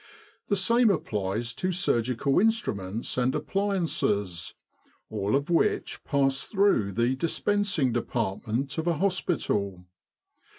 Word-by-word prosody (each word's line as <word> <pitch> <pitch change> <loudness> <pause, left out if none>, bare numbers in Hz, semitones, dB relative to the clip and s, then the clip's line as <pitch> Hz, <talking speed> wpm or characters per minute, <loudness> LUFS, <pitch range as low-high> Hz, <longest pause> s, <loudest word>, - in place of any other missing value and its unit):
The 200 - +2
same 230 +5 +4
applies 110 - -1
to 185 +9 -2
surgical 130 -5 +1
instruments 115 - -1
and 130 +3 +1
appliances, 150 - -1 0.6
all 100 +4 0
of 140 +4 -1
which 175 +5 +1
pass 135 -2 +1
through 195 - +2
the 120 +5 +1
Dispensing 175 -1 0
Department 120 +4 -2
of 160 - -2
a 170 -2 +2
hospital. 130 - -1
135 Hz, 110 wpm, -27 LUFS, -, 0.6 s, same